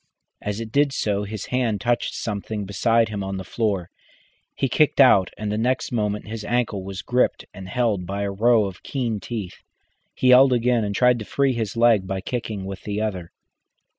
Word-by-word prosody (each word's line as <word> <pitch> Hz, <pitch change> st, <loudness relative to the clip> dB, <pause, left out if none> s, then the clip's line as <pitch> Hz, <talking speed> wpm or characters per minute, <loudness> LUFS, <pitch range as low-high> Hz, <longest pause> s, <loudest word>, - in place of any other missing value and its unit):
As 105 Hz, +1 st, -3 dB
it 115 Hz, -1 st, -6 dB
did 140 Hz, +1 st, +3 dB
so 105 Hz, -4 st, -1 dB
his 105 Hz, 0 st, -6 dB
hand 120 Hz, -5 st, +1 dB
touched 120 Hz, +4 st, -1 dB
something 105 Hz, -1 st, -4 dB
beside 115 Hz, +3 st, +2 dB
him 100 Hz, -2 st, -4 dB
on 95 Hz, 0 st, -4 dB
the 95 Hz, -, -5 dB
floor. 100 Hz, -3 st, -2 dB, 0.6 s
He 135 Hz, -, 0 dB
kicked 150 Hz, +3 st, +2 dB
out, 100 Hz, -9 st, +6 dB
and 105 Hz, -1 st, -3 dB
the 105 Hz, -, -1 dB
next 130 Hz, +3 st, 0 dB
moment 105 Hz, -3 st, -1 dB
his 110 Hz, 0 st, -6 dB
ankle 110 Hz, -3 st, -1 dB
was 95 Hz, 0 st, -6 dB
gripped 125 Hz, +3 st, +1 dB
and 95 Hz, 0 st, -9 dB
held 110 Hz, -7 st, 0 dB
by 100 Hz, +1 st, -3 dB
a 100 Hz, -, -2 dB
row 110 Hz, +2 st, +3 dB
of 95 Hz, -1 st, -7 dB
keen 120 Hz, -6 st, -2 dB
teeth. 105 Hz, -4 st, -6 dB, 0.5 s
He 130 Hz, -, +2 dB
yelled 130 Hz, +1 st, +7 dB
again, 120 Hz, -1 st, +2 dB
and 100 Hz, -1 st, -3 dB
tried 125 Hz, +1 st, +4 dB
to 110 Hz, -, -6 dB
free 140 Hz, +2 st, +1 dB
his 115 Hz, -2 st, -3 dB
leg 115 Hz, -5 st, +4 dB
by 95 Hz, 0 st, -2 dB
kicking 110 Hz, -2 st, -4 dB
with 95 Hz, 0 st, -7 dB
the 105 Hz, 0 st, -3 dB
other. 95 Hz, -6 st, -3 dB
110 Hz, 195 wpm, -23 LUFS, 100-120 Hz, 0.6 s, yelled